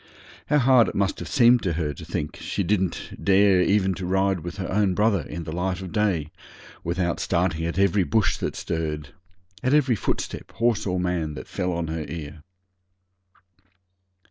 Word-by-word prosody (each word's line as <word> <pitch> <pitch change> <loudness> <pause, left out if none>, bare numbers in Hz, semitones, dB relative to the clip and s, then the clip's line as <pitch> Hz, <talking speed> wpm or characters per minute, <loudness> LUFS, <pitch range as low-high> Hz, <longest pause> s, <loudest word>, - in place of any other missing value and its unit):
How 150 - +3
hard 125 -3 +5
it - - -5
must 100 -1 0
have - - -6
seemed 120 -2 +5
to 90 -4 -1
her 75 -2 -2
to - - -10
think 75 0 -4
she 100 - -3
didn't 95 -1 -2
dare 100 -1 +5
even 95 0 +2
to 90 +1 -5
ride 95 0 +1
with 85 +4 -7
her 95 - -3
own 95 -2 +2
brother 105 -3 +2
in 85 +2 -6
the 80 - -6
light 90 +2 -2
of 95 -2 -7
day 95 -8 0 0.5
without 85 0 -1
starting 85 -2 0
at 85 - -4
every 100 0 +3
bush 100 -2 +1
that - - -3
stirred 75 -3 -3 0.5
at 130 +3 +2
every 130 -5 +3
footstep, - - -4
horse 115 -3 +1
or 90 -1 0
man, 85 -4 -1
that 65 - -8
fell 90 0 -2
on 85 -1 -2
her 80 -1 -3
ear! 75 -2 -7
90 Hz, 180 wpm, -24 LUFS, 85-105 Hz, 0.5 s, hard